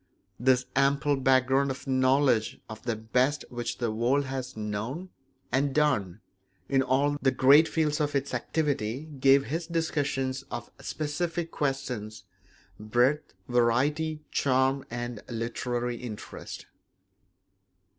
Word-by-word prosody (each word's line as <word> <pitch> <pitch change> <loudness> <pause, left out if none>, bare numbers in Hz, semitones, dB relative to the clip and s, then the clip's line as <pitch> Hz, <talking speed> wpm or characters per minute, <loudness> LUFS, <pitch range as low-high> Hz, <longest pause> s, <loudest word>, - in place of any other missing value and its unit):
This 125 +1 +3
ample 140 +2 +3
background 135 +1 +3
of 135 0 -5
knowledge 130 -3 +2
of 110 0 -9
the 120 -2 -2
best 125 +7 0
which 120 -1 -3
the 120 -3 -1
world 125 +6 +1
has 130 -2 -5
known 110 - -4 0.4
and 135 0 +1
done 105 - +1 0.5
in 135 -1 +3
all 140 +3 +2
the 135 - +4
great 140 +4 +6
fields 155 -2 0
of 145 -1 -1
its 140 0 -1
activity 130 -2 -1 0.2
gave 135 +1 +5
his 165 +3 -3
discussions 145 -5 -1
of - - -6
specific 165 +2 -3
questions 125 -7 -3 0.6
breadth, 120 +8 +1
variety, 145 +6 +1
charm, 130 0 +2
and 120 -2 -5
literary 120 +1 -2
interest. 115 -4 -8
130 Hz, 115 wpm, -28 LUFS, 120-145 Hz, 0.6 s, great